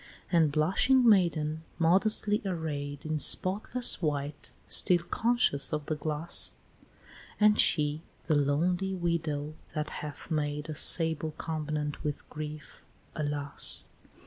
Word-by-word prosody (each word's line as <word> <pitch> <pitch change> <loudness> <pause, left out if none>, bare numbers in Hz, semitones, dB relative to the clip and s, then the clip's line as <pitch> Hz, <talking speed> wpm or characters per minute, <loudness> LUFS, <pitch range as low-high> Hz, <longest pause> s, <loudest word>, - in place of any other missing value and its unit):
And 165 -4 +3
blushing 195 - +3
maiden 160 -6 +2 0.2
modestly 205 +5 +2
array'd 150 -6 -4
In 155 0 -2
spotless 205 - +2
white, 145 -2 -3 0.2
still 175 -2 +4
conscious 225 - +1
of 150 -2 -3
the 155 - -2
glass; 155 +2 -3 0.9
And 210 0 +4
she, 150 0 +3 0.2
the 160 - +1
lonely 175 +7 0
widow, 160 -4 -2 0.2
that 150 0 -3
hath 150 +2 -8
made 150 0 -2
A 155 - -4
sable 160 -1 +3
covenant 150 -2 -4
with 150 -1 -4
grief, 155 0 -8 0.3
alas! 145 -2 +1
155 Hz, 115 wpm, -29 LUFS, 150-175 Hz, 0.9 s, still